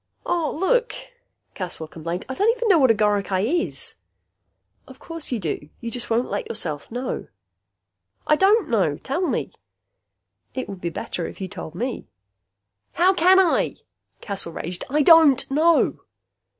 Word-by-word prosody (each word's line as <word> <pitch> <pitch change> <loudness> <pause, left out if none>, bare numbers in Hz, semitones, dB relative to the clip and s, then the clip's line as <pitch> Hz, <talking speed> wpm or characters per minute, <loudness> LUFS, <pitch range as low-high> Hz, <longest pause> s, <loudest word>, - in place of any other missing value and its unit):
"Aw, 335 -4 0
look," 485 +8 +1 0.6
Caswell 175 -4 -6
complained, 170 +3 -5
"I 260 - -4
don't 410 +11 +2
even 475 -1 -1
know 360 -5 +6
what 260 -3 +5
a 225 - +5
goricae 205 -1 +1 0.2
is." - - -3 0.9
"Of - - -13
course 330 -4 -8
you 245 - 0
do. 155 -5 -4
You 235 - -5
just 245 -1 -6
won't 235 +2 +1
let - - -3
yourself 155 -9 -4
know." 245 +2 -4 1.0
"I 305 - +4
don't 395 +5 +4
know. 185 -11 +1
Tell 275 +7 -3
me." - - -2 1.0
"It 260 - -3
would 195 -2 -8
be 170 - -2
better 170 +1 -4
if - - -10
you 190 - -4
told 160 -2 -8
me." 245 +6 -4 0.9
"How 365 +3 +4
can 370 +1 +5
I?" 375 -3 +3 0.5
Caswell 195 -5 -4
raged. 175 +2 -5
"I 295 +2 +2
don't 315 -5 +7
know!" 320 +4 +3
245 Hz, 155 wpm, -23 LUFS, -, 1.0 s, don't